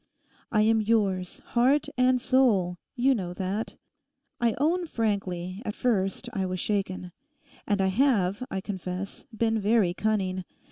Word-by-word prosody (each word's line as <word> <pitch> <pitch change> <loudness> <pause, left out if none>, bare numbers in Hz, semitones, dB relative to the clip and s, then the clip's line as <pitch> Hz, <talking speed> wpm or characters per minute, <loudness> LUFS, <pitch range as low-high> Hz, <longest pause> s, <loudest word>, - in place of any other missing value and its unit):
I 215 -2 +4
am 220 0 +4
yours, 200 -5 0
heart 260 +5 +3
and 255 0 +3
soul—you 245 0 +2
know 180 -7 -3
that. 195 +4 -3 0.6
I 235 -2 +2
own 335 +6 +1
frankly, 195 - -2
at 210 - -4
first 210 -1 0
I 195 - -1
was 185 0 -3
shaken. 185 -3 -2 0.6
And 205 -1 +1
I 190 - +3
have, 205 -2 +2
I 190 - -3
confess, 190 -1 -5
been 225 0 +1
very 205 -3 +3
cunning. 190 -3 -1
210 Hz, 135 wpm, -27 LUFS, 185-235 Hz, 0.6 s, I